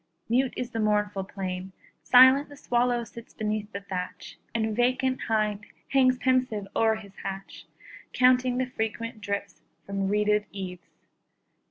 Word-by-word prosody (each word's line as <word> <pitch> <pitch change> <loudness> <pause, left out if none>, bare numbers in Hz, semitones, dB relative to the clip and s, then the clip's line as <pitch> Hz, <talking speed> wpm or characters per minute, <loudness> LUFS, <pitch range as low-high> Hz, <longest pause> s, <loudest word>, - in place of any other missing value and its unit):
Mute 255 +2 +2
is 245 - -4
the 225 - -3
mournful 210 -2 +1
plain; 190 -1 -5 0.3
Silent 260 +3 +7
the 285 - -12
swallow 245 -2 +1
sits 235 0 -12
beneath 215 -1 -2
the 200 - -5
thatch, 185 -2 -6 0.2
And 220 -1 0
vacant 255 +2 +1
hind 215 -2 0 0.3
hangs 255 -2 +4
pensive 255 -6 +1
o'er 225 -1 +3
his 200 -3 -12
hatch, 195 0 -7 0.4
Counting 255 0 +3
the 255 - +1
frequent 230 -1 -4
drips 200 -2 -4 0.2
from 195 -1 -2
reeded 210 +1 +2
eaves. 185 -3 -7
220 Hz, 140 wpm, -27 LUFS, 200-250 Hz, 0.4 s, Silent